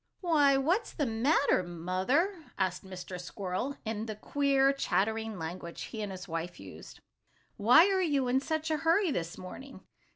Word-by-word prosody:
"Why, 295 -6 +4
what's 335 - 0
the 295 - -1
matter, 255 - +2
Mother?" 190 - -1
asked 185 -2 -1
Mr. 185 -1 -7
Squirrel, 195 +10 -4
in 220 0 -3
the 215 - -4
queer, 275 +3 +2
chattering 220 -4 -1
language 170 +1 -6
he 220 - -6
and 205 -2 -4
his 185 0 -8
wife 165 +1 -4
used. - - -11 0.5
"Why 245 - +7
are 385 -1 +2
you 285 -7 +1
in 255 +2 +3
such 315 +3 -2
a 310 - +2
hurry 330 +4 +2
this 170 -7 -3
morning? 265 +9 -10
230 Hz, 160 wpm, -30 LUFS, 185-290 Hz, 0.5 s, Why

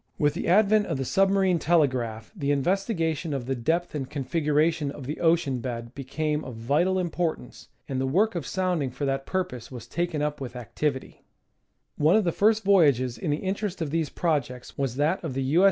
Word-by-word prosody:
With 145 -1 +2
the 170 - -4
advent 210 +3 +4
of 160 - -2
the 135 - -2
submarine 195 +1 +3
telegraph 130 -10 +1
the 140 - -2
investigation 165 - 0
of 130 -3 -4
the 135 - -1
depth 160 +8 -1
and 135 -4 -4
configuration 150 +1 0
of 140 -1 -8
the 150 +4 -4
ocean 160 -6 +2
bed 115 -1 -5
became 150 +3 -2
of 130 -3 -7
vital 145 +11 +1
importance, 170 -6 -3 0.2
and 130 -1 -2
the 135 - 0
work 205 +11 +2
of 170 -7 -4
sounding 180 -7 0
for 135 +3 -4
that 135 0 -2
purpose 180 -11 -3
was 125 -3 -8
taken 170 -3 -2
up 150 -1 -2
with 130 -2 -6
activity; 130 +3 -3 0.8
one 155 +3 +4
of 220 - +4
the 170 - +1
first 215 +4 +3
voyages 140 -11 +4
in 115 - -4
the 145 - +1
interest 195 0 -2
of 160 -4 -3
these 160 -2 0
projects 140 -7 -2
was 135 -3 -2
that 150 +7 +1
of 150 -6 -4
the 135 - -1
U. 145 +6 +2
150 Hz, 195 wpm, -26 LUFS, 135-175 Hz, 0.8 s, advent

